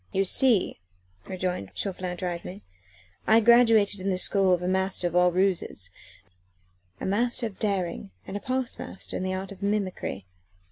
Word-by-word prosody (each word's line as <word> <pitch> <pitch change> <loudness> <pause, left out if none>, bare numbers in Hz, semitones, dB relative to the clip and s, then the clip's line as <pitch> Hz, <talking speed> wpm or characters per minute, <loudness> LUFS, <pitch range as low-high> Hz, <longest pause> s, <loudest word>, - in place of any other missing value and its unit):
"You 195 - +1
see," 230 0 +3 0.5
rejoined 180 - -3
Chauvelin 185 -2 -3
drily, 180 +2 -5 0.6
"I 220 +1 +7
graduated 225 -3 +5
in 190 +1 -2
the 185 - +1
school 190 0 +3
of 180 -1 +2
a - - -1
master 190 0 0
of 175 0 -1
all 180 0 +5
ruses 180 - 0 1.1
a - - -4
master 235 +5 0
of 215 -4 -6
daring 185 - -2 0.2
and 195 - -7
a - - -2
past 255 +1 -2
master - - -8
in - - -2
the 185 0 -1
art 190 +2 -5
of 195 -1 -11
mimicry. 200 - -2
190 Hz, 160 wpm, -27 LUFS, 180-210 Hz, 1.1 s, I